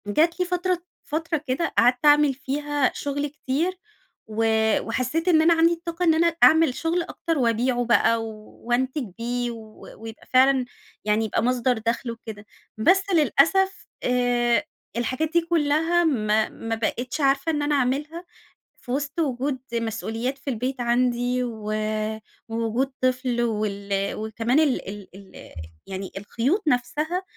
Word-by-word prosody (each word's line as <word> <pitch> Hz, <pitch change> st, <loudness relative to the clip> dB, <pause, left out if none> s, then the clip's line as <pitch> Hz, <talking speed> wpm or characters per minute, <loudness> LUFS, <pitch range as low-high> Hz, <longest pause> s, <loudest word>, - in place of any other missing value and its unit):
جات 320 Hz, -, +2 dB
لي 360 Hz, -, +2 dB
فترة 360 Hz, 0 st, -1 dB, 0.2 s
فترة 320 Hz, +2 st, -2 dB
كده 270 Hz, +6 st, -1 dB
قعدت 245 Hz, +4 st, +3 dB
أعمل 295 Hz, -1 st, +6 dB
فيها 285 Hz, 0 st, -1 dB
شغل 285 Hz, +1 st, -3 dB
كتير 300 Hz, +5 st, -2 dB, 0.5 s
و 220 Hz, +1 st, -2 dB, 0.4 s
وحسّيت 255 Hz, +9 st, -2 dB
إن 325 Hz, -3 st, +5 dB
أنا 335 Hz, +2 st, +5 dB
عندي 330 Hz, +1 st, +4 dB
الطاقة 335 Hz, +1 st, -5 dB
إن 325 Hz, -, +5 dB
أنا 335 Hz, +1 st, +2 dB
أعمل 320 Hz, -4 st, +6 dB
شغل 335 Hz, +2 st, 0 dB
أكتر 330 Hz, -1 st, -3 dB
وأبيعه 245 Hz, 0 st, +1 dB
بقى، 230 Hz, -1 st, +3 dB
وأنتج 240 Hz, +5 st, -3 dB
بيه 240 Hz, +1 st, -2 dB
و 220 Hz, -2 st, -12 dB, 0.2 s
ويبقى 225 Hz, 0 st, -10 dB
فعلًا 260 Hz, 0 st, +5 dB, 0.4 s
يعني، 215 Hz, +1 st, +2 dB
يبقى 220 Hz, -, -1 dB
مصدر 250 Hz, 0 st, +1 dB
دخل 230 Hz, +2 st, -2 dB
وكده. 220 Hz, -2 st, -9 dB, 0.3 s
بس 370 Hz, -, +4 dB
للأسف 340 Hz, +5 st, +3 dB, 0.2 s
آآ، 240 Hz, -3 st, +2 dB, 0.3 s
الحاجات 260 Hz, +6 st, -1 dB
دي 340 Hz, -, +4 dB
كلها 330 Hz, +1 st, +2 dB
ما 215 Hz, -8 st, +1 dB
ما 225 Hz, 0 st, -4 dB
بقيتش 240 Hz, +5 st, -3 dB
عارفة 275 Hz, +3 st, +2 dB
إن 295 Hz, -2 st, -1 dB
أنا 290 Hz, 0 st, +1 dB
أعملها 290 Hz, +6 st, -1 dB, 0.6 s
في 245 Hz, -, -11 dB
وسط 285 Hz, +4 st, -2 dB
وجود 270 Hz, -2 st, -1 dB
مسؤوليات 230 Hz, +3 st, -3 dB
في 275 Hz, -, -5 dB
البيت 255 Hz, +2 st, -3 dB
عندي 245 Hz, +1 st, +1 dB
و 220 Hz, -3 st, -5 dB, 0.8 s
ووجود 230 Hz, +4 st, -1 dB
طفل 255 Hz, -1 st, 0 dB
وال 200 Hz, -3 st, -1 dB
وكمان 225 Hz, +5 st, 0 dB
ال 290 Hz, -10 st, 0 dB
ال 200 Hz, -1 st, -8 dB
ال 195 Hz, 0 st, -13 dB, 0.3 s
يعني 190 Hz, 0 st, -6 dB
الخيوط 245 Hz, -, -1 dB
نفسها 300 Hz, +7 st, 0 dB
255 Hz, 140 wpm, -24 LUFS, 230-310 Hz, 0.8 s, أعمل